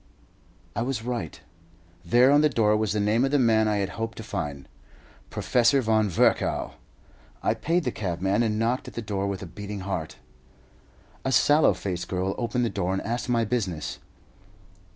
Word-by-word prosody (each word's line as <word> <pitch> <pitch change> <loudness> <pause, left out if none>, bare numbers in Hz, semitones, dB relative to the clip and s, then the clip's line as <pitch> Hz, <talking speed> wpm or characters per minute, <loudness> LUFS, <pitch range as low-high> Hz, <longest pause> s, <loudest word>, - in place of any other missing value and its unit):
I - - -1
was 120 -2 -2
right. 120 -10 -4 0.6
There 120 +9 +5
on 145 +1 +6
the 150 - +4
door 110 -5 +2
was 105 -1 0
the 105 - 0
name 105 +4 +2
of 135 - +2
the 145 - +2
man 110 -4 +3
I 105 - +1
had 100 -2 -1
hoped 115 0 -3
to 110 - -6
find 70 - -5 0.6
Professor 125 +3 +2
Von 110 -3 +2
Virchow. 85 - +1 0.7
I - - +2
paid 170 +2 0
the 125 - -1
cabman, 95 +2 -1
and 110 -2 0
knocked 115 +3 0
at - - -10
the 120 - -4
door 100 -1 -2
with 100 -1 -4
a - - -5
beating 100 +3 -7
heart. 95 -5 -4 1.1
A 130 - -1
sallow 145 +5 +4
faced 90 -3 -4
girl 95 +1 -1
opened 120 +1 0
the - - 0
door, 95 -2 -1
and 95 - -1
asked 120 +3 -3
my 115 -2 +2
business. 100 -9 -3
110 Hz, 180 wpm, -26 LUFS, 95-120 Hz, 1.1 s, on